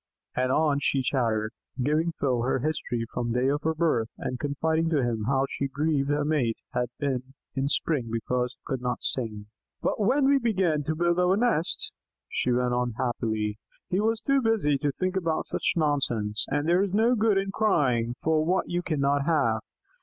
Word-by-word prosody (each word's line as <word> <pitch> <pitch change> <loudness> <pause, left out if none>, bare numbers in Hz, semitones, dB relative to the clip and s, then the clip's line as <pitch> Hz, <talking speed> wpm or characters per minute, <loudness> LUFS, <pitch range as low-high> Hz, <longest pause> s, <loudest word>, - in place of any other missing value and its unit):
And 130 0 +1
on 150 0 +2
she 135 -1 +1
chattered, 115 -4 0 0.3
giving 155 +6 +1
Phil 125 -4 +1
her 130 +3 +1
history 125 -4 -2
from 120 - -2
the 125 - +1
day 130 - +2
of 145 +1 0
her 160 +1 0
birth, 155 -9 +1
and 125 0 -4
confiding 160 +3 0
to 150 -5 +2
him 115 -3 -1
how 135 0 +2 0.3
grieved 145 -1 0
her 145 0 +1
mate 140 -7 +1 0.2
had 125 -1 0
been 135 -1 -3 0.2
in 135 0 0
spring 140 -6 -1
because 125 +2 -1
he - - -57
could 130 -2 -3
not 125 -1 -2
sing. 110 -5 0 0.3
"But - - -1
when 260 +7 +3
we 280 0 +5
began 190 - +1
to 155 - -1
build 175 +2 +1
our 180 +2 +3
nest," 220 -8 0 0.4
she 125 - -1
went 125 0 +1
on 125 -1 0
happily, 110 -3 -2 0.3
"he 185 - +2
was 225 +1 +1
too 275 -1 +2
busy 210 - +2
to 145 +1 0
think 185 +6 -2
about 170 -4 0
such - - 0
nonsense, 120 -9 0
and 145 +2 0
there 175 +2 +4
is 200 -1 0
no 230 +3 +4
good 220 -3 +3
in 195 0 0
crying 125 - +1
for 155 -1 +2
what 180 +4 +1
you 175 0 -1
cannot 145 -4 0
have! 115 -10 +2
145 Hz, 190 wpm, -27 LUFS, 125-170 Hz, 0.4 s, we